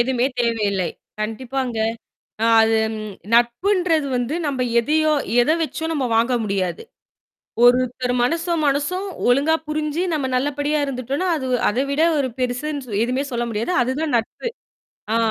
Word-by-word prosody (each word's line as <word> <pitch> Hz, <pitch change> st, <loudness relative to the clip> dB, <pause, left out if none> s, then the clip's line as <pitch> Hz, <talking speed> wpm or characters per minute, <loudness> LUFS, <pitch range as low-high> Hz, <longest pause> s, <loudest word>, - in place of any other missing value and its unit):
எதுவுமே 250 Hz, +1 st, +2 dB
தேவையில்லை. 210 Hz, -6 st, 0 dB, 0.3 s
கண்டிப்பாங்க. 240 Hz, +2 st, -3 dB, 0.7 s
அ -, -, +4 dB, 0.2 s
அது 225 Hz, 0 st, +3 dB, 0.2 s
ம் 215 Hz, -1 st, -6 dB, 0.2 s
நட்புன்றது 315 Hz, -, +2 dB
வந்து 245 Hz, +5 st, -2 dB
நம்ப 270 Hz, -3 st, -2 dB, 0.2 s
எதையோ 310 Hz, +5 st, +2 dB, 0.3 s
எத 240 Hz, -, +1 dB
வச்சோ 320 Hz, 0 st, -4 dB
நம்ப 280 Hz, -4 st, -1 dB
வாங்க 235 Hz, +3 st, +2 dB
முடியாது. 195 Hz, -, -2 dB, 0.8 s
ஒருத்தர் 250 Hz, 0 st, +3 dB
மனசும், 335 Hz, +4 st, 0 dB
மனசும் 295 Hz, +8 st, 0 dB, 0.2 s
ஒழுங்கா 280 Hz, +6 st, +3 dB
புரிஞ்சு 305 Hz, +2 st, -1 dB
நம்ம 295 Hz, -4 st, -1 dB
நல்லபடியா 290 Hz, +3 st, 0 dB
இருந்துட்டோன்னா, 275 Hz, +6 st, -2 dB
அது 260 Hz, -, -4 dB, 0.2 s
அதைவிட 275 Hz, +6 st, 0 dB, 0.2 s
ஒரு 275 Hz, -, +1 dB
பெருசுன்னு 255 Hz, +3 st, -2 dB
சொ -, -, -9 dB
எதுவுமே 255 Hz, +4 st, -1 dB
சொல்ல 240 Hz, 0 st, -1 dB
முடியாது. 220 Hz, +10 st, -2 dB
அதுதான் 285 Hz, +5 st, -2 dB
நட்பு. 230 Hz, -, -4 dB, 0.7 s
அ -, -, +4 dB
260 Hz, 135 wpm, -21 LUFS, 235-300 Hz, 0.8 s, அ